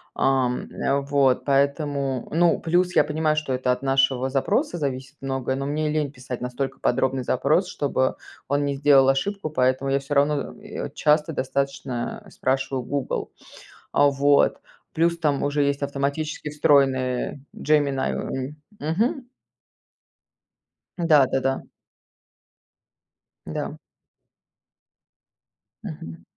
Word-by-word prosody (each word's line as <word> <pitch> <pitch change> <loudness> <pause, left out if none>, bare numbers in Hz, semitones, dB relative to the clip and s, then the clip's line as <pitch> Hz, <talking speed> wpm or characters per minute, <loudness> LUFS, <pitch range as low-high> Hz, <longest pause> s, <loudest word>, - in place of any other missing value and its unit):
ам, 130 -2 +1 0.4
вот 140 -3 +2
поэтому. 140 -2 0
Ну, 170 +1 +3
плюс 180 +2 +1
я - - +6
понимаю, 155 +1 0
что 155 -3 -2
это 125 0 0
от 125 - -2
нашего 135 -1 +2
запроса 185 - 0
зависит 135 -1 -4
многое, 135 -1 -2
но 135 - -3
мне 150 +1 -1
лень 150 -2 -1
писать 125 -2 -7
настолько 135 +2 -4
подробный 130 +1 +1
запрос, 145 +9 +2
чтобы 130 -2 0 0.3
он 145 +1 +1
не 140 - 0
сделал 135 -1 +5
ошибку, 155 +6 -1
поэтому 130 0 +1
я 140 - +2
всё 140 +1 -4
равно, 145 0 +2
э, - - -6
часто 150 +1 +2
достаточно 135 -2 -3
спрашиваю 130 0 -1
Google. 140 +2 -3 0.6
Вот, 140 0 +3 0.3
плюс 170 +1 +2
там 150 -4 0
уже 145 0 +1
есть 140 0 0
автоматически 140 +2 -2
встроенная 135 -3 +2
Gemini, 145 -3 +1
м. 135 +3 -4 0.2
Мгм. 220 - -1 1.8
Да-да-да. 135 -3 +3 1.8
Да. - - -5 2.1
Мгм. 80 +2 -8
140 Hz, 110 wpm, -24 LUFS, 130-150 Hz, 2.1 s, я